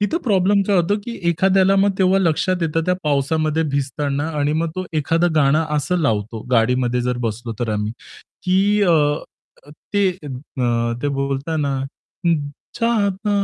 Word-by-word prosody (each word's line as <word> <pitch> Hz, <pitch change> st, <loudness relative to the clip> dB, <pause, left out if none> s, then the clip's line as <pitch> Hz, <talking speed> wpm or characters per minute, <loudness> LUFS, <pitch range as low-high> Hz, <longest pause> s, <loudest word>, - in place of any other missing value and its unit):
तिथे 210 Hz, +11 st, 0 dB
प्रॉब्लेम 200 Hz, -2 st, +3 dB
काय 200 Hz, -, +3 dB
होतो, 180 Hz, +4 st, +2 dB
की 235 Hz, -, -5 dB, 0.2 s
एखाद्याला 190 Hz, +3 st, +3 dB
मग 200 Hz, +1 st, +4 dB
तेव्हा 190 Hz, 0 st, +4 dB
लक्षात 180 Hz, +1 st, +1 dB
येतं 165 Hz, 0 st, 0 dB
त्या 180 Hz, -, +3 dB
पावसामध्ये 155 Hz, +2 st, +1 dB
भिजताना 140 Hz, +2 st, -1 dB
आणि 145 Hz, +1 st, +1 dB
मग 160 Hz, +1 st, -1 dB
तो 185 Hz, -, -2 dB, 0.2 s
एखादं 165 Hz, +3 st, +1 dB
गाणं 155 Hz, +2 st, +3 dB
असं 150 Hz, +5 st, 0 dB
लावतो 110 Hz, -6 st, -1 dB
गाडीमध्ये 125 Hz, +1 st, +2 dB
जर 125 Hz, 0 st, -1 dB
बसलो 115 Hz, +2 st, -4 dB
तर 120 Hz, -2 st, -1 dB
आम्ही, 105 Hz, +1 st, -2 dB, 0.5 s
की 200 Hz, +3 st, +3 dB
अ, 175 Hz, -4 st, +4 dB, 1.0 s
ते 200 Hz, -1 st, +4 dB, 0.2 s
अ, 125 Hz, -3 st, -2 dB
ते 145 Hz, -, +1 dB
बोलताना 140 Hz, +1 st, -1 dB, 0.5 s
हं, 150 Hz, -4 st, +1 dB, 0.3 s
चाहता 210 Hz, -3 st, 0 dB
155 Hz, 145 wpm, -20 LUFS, 135-190 Hz, 1.0 s, मग